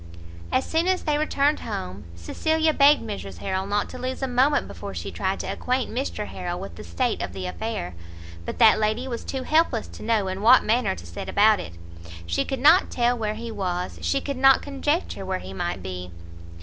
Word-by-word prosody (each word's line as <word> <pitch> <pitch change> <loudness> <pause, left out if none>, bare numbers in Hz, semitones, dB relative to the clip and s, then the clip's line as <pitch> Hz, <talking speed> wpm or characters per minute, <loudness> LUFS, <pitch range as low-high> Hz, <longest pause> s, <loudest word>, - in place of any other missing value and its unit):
As 260 - +2
soon 330 +2 0
as 375 0 +1
they 300 -2 +1
returned 295 -1 +1
home, 95 +2 -6
Cecilia 315 - 0
begged 290 -1 +5
Mrs 100 - -6
Harrel 190 - -2
not 205 0 0
to 255 - -8
lose 255 +2 -4
a - - +1
moment 260 +4 +2
before - - -8
she - - -5
tried - - -2
to - - -6
acquaint 255 +1 -1
Mr 245 -4 -3
Harrel 175 -2 -5
with 195 - -7
the - - -9
state 250 -3 -1
of 100 -3 -4
the 95 -1 -5
affair. 90 0 -4 0.5
But - - -5
that 225 -3 +6
lady 215 +4 0
was 235 -3 -4
too 265 -1 -4
helpless 310 -8 +2
to - - -12
know 215 -3 +1
in 190 +1 -4
what 240 +4 +7
manner 230 - +1
to 85 -1 -11
set 85 0 -7
about 210 0 +5
it; 130 - -7 0.5
she 85 0 0
could 270 - -3
not 315 +8 +6
tell 240 0 +1
where 215 -2 -2
he 230 +1 -6
was, 180 -4 -3
she 275 - 0
could 280 -2 -4
not 270 0 +5
conjecture 290 - -2
where 190 0 -2
he 95 - -9
might 90 -1 -3
be. 90 -1 -6
225 Hz, 210 wpm, -24 LUFS, 180-270 Hz, 0.5 s, what